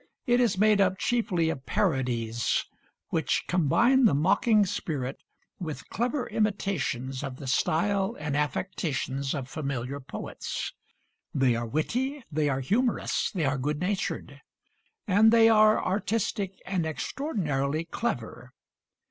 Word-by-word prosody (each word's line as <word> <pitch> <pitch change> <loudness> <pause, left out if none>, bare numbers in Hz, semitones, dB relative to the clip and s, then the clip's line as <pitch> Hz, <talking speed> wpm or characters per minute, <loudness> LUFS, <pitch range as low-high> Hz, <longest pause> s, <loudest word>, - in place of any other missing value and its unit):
It 245 -2 +3
is 230 -6 +2
made 210 0 +4
up 190 -1 +2
chiefly 195 -10 +1
of 135 -4 -8
parodies, 120 -3 0 0.4
which - - 0
combine 235 - +4
the 205 - +5
mocking 200 +7 +3
spirit 140 -7 -3 0.4
with 160 -5 -6
clever 245 +4 -1
imitations 170 - -1
of 135 -2 -5
the 135 - -9
style 190 +9 +1
and 150 -2 -2
affectations 145 -2 -2
of 135 -3 -4
familiar 140 -2 -4
poets. 135 - -5 0.6
They 130 -4 +3
are 120 0 -2
witty; 250 - -1
they 150 -1 +1
are 135 -1 -1
humorous; 230 - 0
they 170 -6 -1
are 135 0 0
good 145 +3 -1
natured; 190 +3 -3 0.6
and 210 +2 +5
they 225 -1 +6
are 215 -1 +6
artistic 200 -1 -1
and 185 -2 -1
extraordinarily 160 - -2
clever. 125 - -4
165 Hz, 125 wpm, -28 LUFS, 135-215 Hz, 0.6 s, they